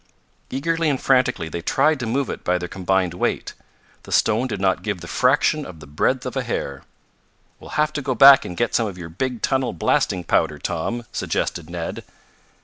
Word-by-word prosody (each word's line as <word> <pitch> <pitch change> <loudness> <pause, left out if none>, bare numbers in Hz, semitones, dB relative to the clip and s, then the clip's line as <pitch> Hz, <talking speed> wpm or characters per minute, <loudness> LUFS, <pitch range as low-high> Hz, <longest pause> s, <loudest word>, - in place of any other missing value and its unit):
Eagerly 165 +4 0
and 135 -3 0
frantically 125 -9 +2
they 85 +2 -5
tried 145 - +2
to 120 - -3
move 135 +3 0
it - - -7
by 90 0 +1
their 90 0 -5
combined 95 -1 0
weight. 90 - -2 0.5
The - - -13
stone 110 +4 +2
did 110 - -4
not 95 -1 +1
give 105 -4 -3
the 85 - -9
fraction 135 - +2
of 85 - -10
the 75 - -11
breadth 75 +1 0
of - - -5
a - - 0
hair. 70 -1 -4 0.8
"We'll - - -12
have 150 0 +2
to 145 - -2
go 130 -2 -2
back 140 +1 +9
and 90 - -7
get 120 - 0
some 115 - +2
of 95 -3 -7
your 85 -2 -8
big 120 +8 -4
tunnel 130 -4 +1
blasting 90 +2 0
powder, - - +1
Tom," 115 +8 -3
suggested 85 -1 -2
Ned. 85 -1 -5
110 Hz, 200 wpm, -22 LUFS, 90-135 Hz, 0.8 s, back